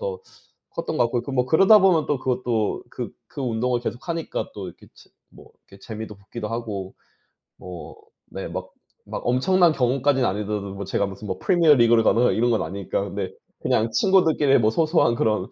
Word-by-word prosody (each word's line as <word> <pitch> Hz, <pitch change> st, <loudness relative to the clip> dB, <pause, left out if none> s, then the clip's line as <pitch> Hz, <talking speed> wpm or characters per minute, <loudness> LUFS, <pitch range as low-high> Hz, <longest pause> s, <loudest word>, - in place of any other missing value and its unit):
더 470 Hz, -2 st, -4 dB, 0.5 s
컸던 165 Hz, -1 st, -4 dB
것 120 Hz, -3 st, +2 dB
같고 125 Hz, +3 st, -2 dB
뭐 125 Hz, -1 st, +1 dB
그러다 195 Hz, -, +6 dB
보면 180 Hz, -5 st, +3 dB
또 145 Hz, -, 0 dB
그것도 125 Hz, -4 st, -1 dB
그 -, -, -6 dB, 0.2 s
그 -, -, -9 dB
운동을 120 Hz, 0 st, -1 dB
계속 120 Hz, +5 st, -6 dB
하니까 165 Hz, -1 st, -3 dB
또 100 Hz, -2 st, -6 dB
이렇게 85 Hz, -, -15 dB
치 -, -, -20 dB, 0.2 s
뭐 -, -, -16 dB, 0.2 s
이렇게 100 Hz, -, -16 dB
재미도 110 Hz, 0 st, -7 dB
붙기도 105 Hz, +2 st, -7 dB
하고 105 Hz, -5 st, -5 dB, 0.6 s
뭐 90 Hz, -2 st, -9 dB, 0.3 s
네. -, -, -7 dB
막 -, -, -6 dB, 0.4 s
막 -, -, -5 dB
엄청난 170 Hz, +8 st, +3 dB
경험까지는 135 Hz, -1 st, +1 dB
아니더라도 100 Hz, 0 st, -4 dB
제가 100 Hz, +1 st, -1 dB
무슨 100 Hz, +1 st, -9 dB
뭐 95 Hz, -, -3 dB
프리미어리그를 135 Hz, -, +4 dB
가거나 120 Hz, +2 st, +3 dB
이런 120 Hz, +2 st, +1 dB
건 115 Hz, -, +1 dB
아니니까. 100 Hz, -1 st, -3 dB
근데 -, -, -4 dB, 0.3 s
그냥 110 Hz, +1 st, +1 dB
친구들끼리 165 Hz, -8 st, +3 dB
뭐 110 Hz, -2 st, +3 dB
소소한 155 Hz, -3 st, +2 dB
그런 105 Hz, -5 st, 0 dB
120 Hz, 375 characters per minute, -23 LUFS, 105-150 Hz, 0.6 s, 그러다